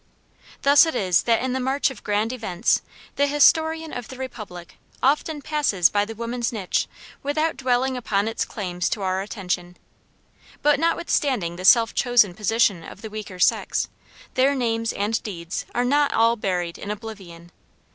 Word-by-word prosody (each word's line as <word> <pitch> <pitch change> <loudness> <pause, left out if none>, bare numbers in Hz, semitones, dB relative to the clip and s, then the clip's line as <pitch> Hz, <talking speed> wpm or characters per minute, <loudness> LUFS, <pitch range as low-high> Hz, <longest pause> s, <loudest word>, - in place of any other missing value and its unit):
Thus 285 +3 +7
it 320 - -2
is 185 -3 +2
that 230 +1 +3
in 260 -1 -1
the 260 - -1
march 270 +2 +1
of 265 - -12
grand 210 +3 0
events 215 -4 0 0.4
the 285 - +3
historian 320 +2 +3
of 245 -2 -5
the 260 - -10
Republic 215 -9 -8 0.3
often 295 +2 +1
passes 290 - +2
by 205 0 +2
the 225 +1 -8
woman's 235 +1 -3
niche 205 -6 -1 0.3
without 310 +3 0
dwelling 260 0 0
upon 215 -4 0
its 225 - -1
claims 180 -4 -3
to 205 - -3
our 185 0 0
attention. 180 -3 -4 0.9
But 295 -1 +4
notwithstanding 280 - 0
the 185 +1 -6
self 230 +3 +6
chosen 245 -7 +3
position 210 -2 +1
of 200 - -11
the 220 - -7
weaker 210 -3 -7
sex, 180 - +1 0.4
their 270 +2 +3
names 230 -3 0
and 210 +3 -1
deeds 175 -6 -5
are 245 - +1
not 285 +3 +2
all 230 +1 +4
buried 180 -5 -2
in 200 - -7
oblivion. 195 -6 -8
225 Hz, 165 wpm, -23 LUFS, 195-265 Hz, 0.9 s, Thus